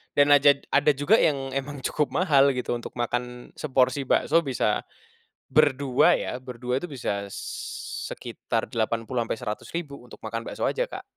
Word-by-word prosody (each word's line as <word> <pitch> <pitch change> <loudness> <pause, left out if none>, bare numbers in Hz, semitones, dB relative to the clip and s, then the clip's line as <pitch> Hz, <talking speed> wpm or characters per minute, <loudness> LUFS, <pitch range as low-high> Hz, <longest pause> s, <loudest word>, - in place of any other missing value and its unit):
dan 145 0 +5
ajad 140 0 +6
ada 145 +1 +4
juga 170 +11 +4
yang 135 -3 +1
emang 135 0 -4
cukup 145 -3 -1
mahal 140 -6 +4
gitu 125 - -3
untuk 120 - -7
makan 125 0 -3
seporsi 135 -1 +1
bakso 165 - +3
bisa, 130 -8 -1 0.6
berdua 140 -3 +4
ya, - - -4
berdua 125 0 -4
itu - - -5
bisa 100 -7 -3
s - - -6 0.3
sekitar - - -4
80 115 +2 -1
sampai 115 - -3
100.000 140 +8 -5
untuk 120 -1 -13
makan 115 +1 -3
bakso - - -4
aja, - - +1
Kak. - - -7
135 Hz, 155 wpm, -26 LUFS, 120-145 Hz, 0.6 s, ajad